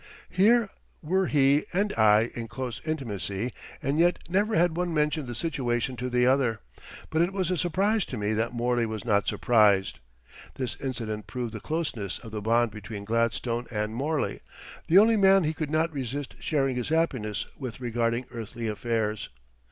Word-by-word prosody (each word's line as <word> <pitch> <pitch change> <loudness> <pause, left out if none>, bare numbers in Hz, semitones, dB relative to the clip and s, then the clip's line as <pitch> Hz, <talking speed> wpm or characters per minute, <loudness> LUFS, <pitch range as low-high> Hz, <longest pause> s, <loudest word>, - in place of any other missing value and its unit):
Here 215 +3 +4 0.3
were 185 +4 +1
he 145 +3 +3
and 205 +3 +1
I 110 +1 +4
in 115 -1 -5
close 120 0 -5
intimacy, 115 - -3 0.3
and 140 +3 0
yet 175 +1 +4
never 205 +5 +1
had 170 -1 +3
one 175 -1 -1
mentioned 150 -1 0
the 120 - -5
situation 125 -3 -1
to 125 +1 -3
the 125 0 +2
other; 125 -4 +2 0.5
but 160 - +2
it 175 +2 +2
was 190 -2 -1
a - - +2
surprise 195 +5 +1
to 125 - -6
me 105 +1 0
that 110 +2 0
Morley 120 -1 0
was 110 -1 -5
not 105 -3 +2
surprised. 105 -5 +3 0.6
This 130 -3 -3
incident 115 -5 -4
proved 120 -3 -4
the 110 - -5
closeness 125 - -3
of 115 - -11
the 105 -1 -4
bond 115 +1 +2
between 105 -1 -8
Gladstone 115 +2 0
and 105 -1 -2
Morley 145 +5 -1 0.5
the 170 - +5
only 220 +2 +6
man 195 -1 +5
he 155 0 0
could 155 -2 -4
not 160 +1 +1
resist 135 0 -4
sharing 135 -4 0
his 125 - -2
happiness 125 -11 0
with 130 -4 -6
regarding 120 0 -1
earthly 115 0 -5
affairs. 110 -1 -2
125 Hz, 175 wpm, -27 LUFS, 115-160 Hz, 0.6 s, only